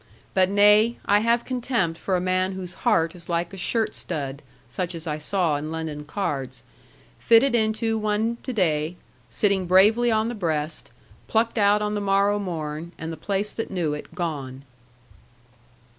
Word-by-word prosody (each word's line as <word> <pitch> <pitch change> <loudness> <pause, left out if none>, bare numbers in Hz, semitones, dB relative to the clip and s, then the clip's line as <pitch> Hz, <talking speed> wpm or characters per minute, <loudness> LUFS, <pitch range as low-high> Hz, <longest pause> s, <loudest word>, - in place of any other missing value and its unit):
But 185 -1 +3
nay; 210 +3 +5
I 205 +1 +4
have 235 +2 +1
contempt 235 -10 -1
for 190 - -1
a - - +1
man 185 +1 0
whose 185 -2 -6
heart 165 0 +1
is 175 -2 -13
like 170 +1 -1
a - - -6
shirt 220 +4 0
stud 140 -1 -5 0.3
(such 170 +8 -4
as 165 0 -7
I 155 -1 -3
saw 165 -1 0
in 150 +2 -5
London 160 -2 -5
cards), 135 -8 -4 0.6
fitted 235 +3 +5
into 225 0 +1
one 215 +2 0
to 260 - -4
day, 165 -6 0 0.3
sitting 195 -3 +1
bravely 210 +7 +5
on 220 0 +2
the 240 - -3
breast; 160 -7 -2 0.4
plucked 225 +1 +1
out 205 +1 +4
on 210 0 -1
the 205 - -2
morrow 200 +1 +2
morn, 165 -3 -5
and 160 +1 -5
the - - -5
place 200 +6 -2
that 225 - -5
knew 170 -6 -1
it, 150 +2 -8
gone. 140 -7 -4
185 Hz, 170 wpm, -24 LUFS, 160-215 Hz, 0.6 s, nay